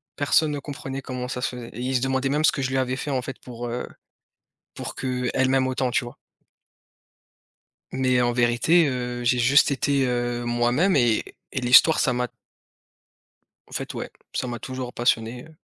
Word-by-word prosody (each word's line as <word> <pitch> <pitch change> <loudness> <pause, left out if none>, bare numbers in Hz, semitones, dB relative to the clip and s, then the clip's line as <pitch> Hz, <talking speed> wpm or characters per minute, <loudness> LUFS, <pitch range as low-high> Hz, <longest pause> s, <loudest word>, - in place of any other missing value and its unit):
personne 150 +2 +2
ne 145 - -3
comprenait 135 -1 -6
comment 125 -1 -5
ça 125 0 -4
se - - 0
faisait 120 -1 -8
et 115 - -10
ils 130 +1 -1
se 125 - +2
demandaient 135 0 0
même 150 +2 +1
ce - - +5
que 135 - -4
je 130 - -1
lui 135 - -1
avais 130 0 0
fait, 145 - -4
en 130 - 0
fait 135 -2 -7
pour, 120 -1 -7
heu, 120 +1 -4 0.9
pour - - -7
qu'elle 130 0 0
m'aime 130 -1 +2
autant, 130 -1 -1
tu 125 - 0
vois? 120 - -10 1.8
Mais 130 -1 +2
en 120 - +2
vérité, 120 +8 +3
heu, 125 -2 -3
j'ai 125 +1 +3
juste 130 +5 +5
été, 140 0 +1
heu, 120 -1 -1
moi-même 120 +10 +2
et 120 -4 +3 0.3
et 130 - +1
l'Histoire 130 +6 +6
ça 125 - +2
m'a 125 0 -1 1.4
En - - -21
fait - - -5
ouais, - - -5 0.2
ça - - -1
m'a 120 -1 -4
toujours 130 +1 -6
passionné, 120 0 0
heu, 160 - -16
125 Hz, 190 wpm, -24 LUFS, 120-135 Hz, 1.8 s, l'Histoire